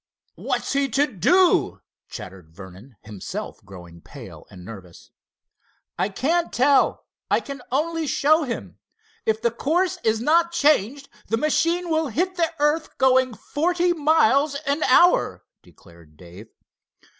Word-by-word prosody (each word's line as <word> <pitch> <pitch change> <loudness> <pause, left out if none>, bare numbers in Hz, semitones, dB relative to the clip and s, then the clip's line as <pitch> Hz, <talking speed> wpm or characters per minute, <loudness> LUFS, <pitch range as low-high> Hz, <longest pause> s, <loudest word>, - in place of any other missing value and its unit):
"What's - - -3
he 275 0 0
to 275 +5 +2
do?" 345 - +2 0.3
chattered 90 -3 -10
Vernon, 95 +7 -13
himself 105 -3 -8
growing 90 -4 -13
pale - - -13
and 90 -1 -13
nerveless. 95 -5 -13 0.8
"I - - -1
can't 330 - -1
tell—I 275 +2 +1
can 275 -2 -9
only 320 +3 -1
show 310 +4 +2
him. 250 -6 -6 0.5
If 220 0 0
the 235 - +2
course 335 +9 -1
is 220 0 +1
not 335 +7 +2
changed, 280 - +1 0.2
the 225 - 0
machine 330 +5 0
will 315 -1 +1
hit 355 - -1
the 335 -2 0
earth 295 +2 -1
going 260 -2 +2
forty 350 +6 -1
miles 295 -3 +2
an 285 +2 -1
hour," 345 +7 +3 0.2
declared 85 -3 -20
Dave. 90 +6 -13
275 Hz, 130 wpm, -22 LUFS, -, 0.8 s, hour